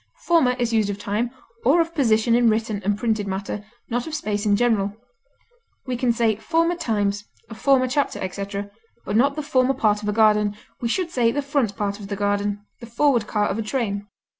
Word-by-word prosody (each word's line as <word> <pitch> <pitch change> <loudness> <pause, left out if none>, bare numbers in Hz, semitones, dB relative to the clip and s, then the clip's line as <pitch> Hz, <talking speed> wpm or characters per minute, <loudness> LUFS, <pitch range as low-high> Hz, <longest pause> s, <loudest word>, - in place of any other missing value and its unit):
Former 325 -7 +4
is 240 -2 -1
used 215 -2 +2
of 200 - -3
time, 210 +3 -2 0.3
or 285 +8 +4
of 330 0 0
position 230 -6 +2
in 235 -1 +5
written 220 -2 -1
or 205 +2 +1
printed 215 -2 -1
matter, 195 +2 -4 0.2
not 245 +2 -2
of 315 - -4
space 210 -7 -2
in 205 - +4
general. 210 -3 +1 0.9
We 255 -2 -2
can 245 0 +1
say 230 -2 +1
former 330 +9 +1
times, 205 -9 -1 0.3
a - - -4
former 255 +2 +3
chapter, 285 +2 0
etc., 200 +2 -5 0.3
but 205 - -2
not 275 +5 +3
the 305 - -3
former 265 -1 +2
part 210 -4 +2
of 210 - -2
a - - +2
garden; 210 -1 +3 0.2
we 235 - 0
should 350 +5 -1
say 240 -6 +2
the 285 +4 -2
front 275 -8 0
part 200 0 -2
of 200 - -8
the 200 - -3
garden, 205 0 -1
the 235 - -10
forward 235 -2 +2
car 210 -1 +1
of 205 - -2
a - - +1
train. 210 -3 -2
220 Hz, 210 wpm, -23 LUFS, 205-255 Hz, 0.9 s, in